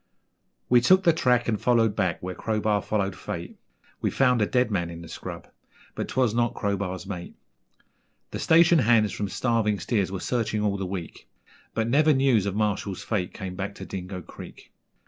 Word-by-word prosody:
We 120 -1 +5
took 185 +9 +5
the 170 -3 +5
track 125 -5 +2
and 110 -3 -1
followed 115 -4 +3
back 90 -6 -1
where 90 0 -4
Crowbar 105 0 0
followed 100 -3 -1
fate, - - -7 0.4
We - - +1
found 125 -3 +2
a 105 - +2
dead 125 -3 +1
man 85 -4 -1
in 85 0 -8
the - - -10
scrub 80 - -8 0.5
but - - -4
'twas 125 -4 +1
not 120 0 0
Crowbar's 100 -3 -2
mate. 90 -3 -7 1.0
The - - -4
station 170 0 +5
hands 115 -4 +3
from 100 -1 -3
Starving 110 -4 0
Steers 100 -6 -1
were 95 - -4
searching 110 -2 -1
all 100 -1 0
the 95 -1 -3
week 90 -3 -7 0.5
But 115 0 0
never 150 +5 +4
news 130 -7 +3
of 100 - -2
Marshall's 105 -2 -1
fate 95 -5 -2
came 95 -3 -6
back 100 +1 -4
to - - -8
Dingo 90 -1 -6
Creek. - - -12
105 Hz, 185 wpm, -26 LUFS, 95-120 Hz, 1.0 s, We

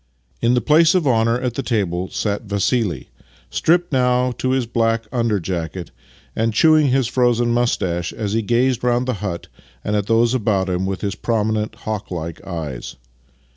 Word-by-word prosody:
In 120 +1 +3
the 125 - +2
place 160 +5 +4
of 180 -4 +2
honour 115 -2 +2
at 125 -2 -2
the 135 - -2
table 95 -7 -1
sat 105 -1 -2
Vassili, 100 - -1 0.4
stripped 175 0 +1
now 125 -1 +2
to 130 - 0
his 130 -1 +1
black 115 0 0
under 115 -4 0
jacket, 85 -1 -4 0.4
and 115 -1 0
chewing 155 +2 +5
his 135 0 +2
frozen 120 -1 +2
moustache 95 -8 0
as 105 -2 -4
he 115 - +1
gazed 120 +3 +1
round 125 +1 +1
the 130 - 0
hut 90 -5 -4 0.4
and 105 - -1
at 105 -1 -1
those 115 +1 +3
about 100 -6 0
him 90 +1 -1
with 95 -2 -3
his 100 -2 -2
prominent, 110 -1 -1
hawklike 90 -6 -4
eyes. 80 -9 -5
115 Hz, 170 wpm, -20 LUFS, 95-125 Hz, 0.4 s, chewing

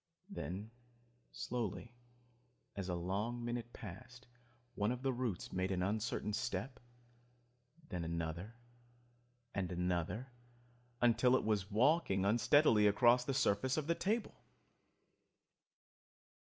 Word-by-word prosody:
Then 105 - -5 0.6
slowly, 120 0 -4 0.8
as 95 -2 -4
a 90 - 0
long 105 +7 -2
minute 120 0 -3
passed, 120 +6 -10 0.5
one 105 +1 0
of 125 +1 -4
the 135 -1 +1
roots 120 -7 -3
made 95 0 0
an 90 -1 0
uncertain 105 +1 -1
step, 125 +3 -3 1.1
then 90 -2 -3
another 85 +5 -4 1.0
and 95 -2 -2
another, 90 +8 -1 0.7
until 120 +1 +5
it - - +1
was 105 -2 0
walking 115 - +3
unsteadily 115 0 +5
across 120 +4 +5
the 135 +1 -2
surface 130 +1 +2
of 155 - 0
the 170 - +2
table! 215 +7 -2
110 Hz, 110 wpm, -36 LUFS, 95-125 Hz, 1.1 s, until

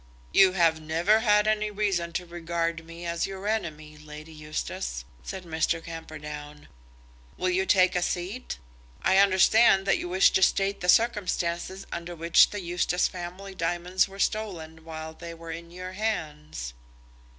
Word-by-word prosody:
"You 190 -1 +6
have 165 -3 +3
never 170 +8 +3
had 210 -2 +4
any 215 0 +1
reason 195 -5 -1
to 180 - -2
regard 170 -1 -3
me 165 +1 -10
as 170 0 -1
your 195 +1 -6
enemy, 155 -8 -3
Lady 155 +1 -11
Eustace," 110 - -5 0.2
said 180 - -7
Mr. 165 0 -1
Camperdown. 150 -2 -8 0.7
"Will 185 0 0
you 190 +1 +1
take 185 -2 +4
a 180 - +2
seat? 185 +8 -3 0.5
I 190 +1 +4
understand 195 +1 +5
that 195 - +2
you 175 - -4
wish 185 +2 +5
to - - +2
state 195 +1 +2
the 180 - -1
circumstances 190 -4 +1
under 170 +1 -5
which 165 +1 +5
the 205 - -5
Eustace 175 0 +1
family 185 +2 -7
diamonds 175 +1 0
were 195 0 -12
stolen 170 -7 -2
while 160 -1 -7
they 170 +1 -9
were 165 0 -8
in 170 +1 -8
your 185 +1 -7
hands." 150 - -4
175 Hz, 155 wpm, -27 LUFS, 160-190 Hz, 0.7 s, You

